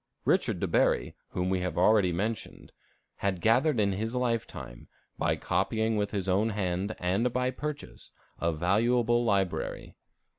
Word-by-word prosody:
Richard -, -, +2 dB
de -, -, 0 dB
Bury, -, -, +1 dB
whom 90 Hz, +1 st, -1 dB
we 95 Hz, -, +1 dB
have 90 Hz, -1 st, -3 dB
already 95 Hz, 0 st, +4 dB
mentioned, 105 Hz, +6 st, -4 dB, 0.5 s
had 95 Hz, -2 st, -1 dB
gathered 120 Hz, -, +3 dB
in 100 Hz, -1 st, +2 dB
his 110 Hz, +5 st, -3 dB
life 120 Hz, -2 st, 0 dB
time, -, -, -10 dB, 0.3 s
by -, -, +2 dB
copying 110 Hz, 0 st, 0 dB
with 105 Hz, -1 st, 0 dB
his 100 Hz, -3 st, -3 dB
own 100 Hz, +4 st, +2 dB
hand 100 Hz, 0 st, -2 dB
and 95 Hz, +7 st, 0 dB
by 125 Hz, +1 st, 0 dB
purchase, 145 Hz, +2 st, -6 dB, 0.3 s
a 85 Hz, -, +1 dB
valuable 115 Hz, +8 st, +2 dB
library. 100 Hz, -5 st, -1 dB
105 Hz, 150 wpm, -29 LUFS, 90-115 Hz, 0.5 s, already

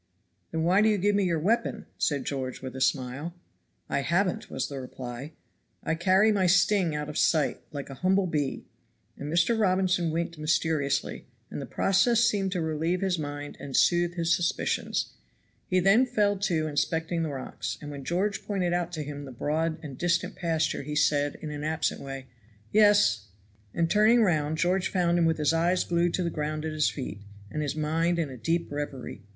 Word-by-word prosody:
"Then 160 Hz, 0 st, -1 dB
why 185 Hz, +4 st, +4 dB
do 220 Hz, -, +4 dB
you 210 Hz, -, +2 dB
give 205 Hz, +2 st, +2 dB
me 200 Hz, -1 st, +2 dB
your 170 Hz, -2 st, +1 dB
weapon?" 205 Hz, +10 st, 0 dB
said 145 Hz, -3 st, 0 dB
George 130 Hz, -2 st, -3 dB
with 130 Hz, 0 st, -6 dB
a 130 Hz, -, -5 dB
smile. 135 Hz, +6 st, -1 dB, 0.5 s
"I -, -, 0 dB
haven't," 175 Hz, +6 st, 0 dB
was 130 Hz, -1 st, -2 dB
the 140 Hz, -1 st, -6 dB
reply. 125 Hz, +3 st, -7 dB, 0.5 s
"I -, -, 0 dB
carry 190 Hz, +6 st, +4 dB
my 195 Hz, -3 st, +2 dB
sting 185 Hz, -2 st, +3 dB
out 150 Hz, 0 st, -3 dB
of 150 Hz, -, -3 dB
sight, 155 Hz, -3 st, +2 dB
like 140 Hz, -2 st, -6 dB
a 135 Hz, -, -11 dB
humble 190 Hz, +1 st, +3 dB
bee." 150 Hz, -5 st, -2 dB, 0.5 s
And 145 Hz, +2 st, -6 dB
Mr. 175 Hz, +8 st, +2 dB
Robinson 185 Hz, -3 st, +2 dB
winked 165 Hz, 0 st, -3 dB
mysteriously, 155 Hz, -2 st, 0 dB, 0.2 s
and -, -, -5 dB
the -, -, -6 dB
process 220 Hz, +5 st, +3 dB
seemed 195 Hz, -4 st, +1 dB
to 180 Hz, -, -1 dB
relieve 160 Hz, +3 st, -1 dB
his 185 Hz, -3 st, 0 dB
mind 145 Hz, -1 st, -5 dB
and 140 Hz, -2 st, -3 dB
soothe 175 Hz, 0 st, +3 dB
his 170 Hz, -1 st, +2 dB
suspicions. 175 Hz, 0 st, -1 dB, 0.5 s
He 185 Hz, -, +2 dB
then 200 Hz, +8 st, +5 dB
fell 205 Hz, -4 st, +2 dB
to 185 Hz, -6 st, 0 dB
inspecting 160 Hz, +2 st, -1 dB
the 160 Hz, -, -1 dB
rocks; 135 Hz, -2 st, -5 dB
and 145 Hz, -1 st, -8 dB
when 140 Hz, -1 st, -7 dB
George 190 Hz, +7 st, -1 dB
pointed 185 Hz, -4 st, -1 dB
out 175 Hz, -1 st, -1 dB
to 155 Hz, -3 st, -3 dB
him 145 Hz, 0 st, -7 dB
the 135 Hz, -, -9 dB
broad 155 Hz, +5 st, -1 dB
and 140 Hz, -4 st, -8 dB
distant 175 Hz, +2 st, 0 dB
pasture 160 Hz, -3 st, 0 dB
he 150 Hz, +2 st, -5 dB
said, 145 Hz, -1 st, +2 dB
in 155 Hz, -, -4 dB
an 145 Hz, 0 st, -5 dB
absent 155 Hz, +1 st, -1 dB
way, 135 Hz, -1 st, -7 dB, 0.5 s
"Yes;" 205 Hz, -, +4 dB, 0.4 s
and 165 Hz, +7 st, +1 dB
turning 215 Hz, +5 st, +5 dB
round 155 Hz, -5 st, +1 dB
George 180 Hz, +3 st, +1 dB
found 175 Hz, -2 st, +2 dB
him 170 Hz, -, +3 dB
with 160 Hz, -1 st, +2 dB
his 150 Hz, 0 st, +2 dB
eyes 175 Hz, +2 st, +2 dB
glued 170 Hz, 0 st, +1 dB
to 185 Hz, -, -1 dB
the 170 Hz, -, -1 dB
ground 155 Hz, 0 st, -3 dB
at 160 Hz, -, -2 dB
his 155 Hz, -1 st, +2 dB
feet, 115 Hz, -7 st, -6 dB, 0.3 s
and 150 Hz, -, -2 dB
his 145 Hz, -1 st, -2 dB
mind 165 Hz, +3 st, 0 dB
in 160 Hz, -5 st, -1 dB
a -, -, -7 dB
deep 165 Hz, +8 st, -1 dB
reverie. 145 Hz, -7 st, -5 dB
165 Hz, 195 wpm, -27 LUFS, 145-185 Hz, 0.5 s, then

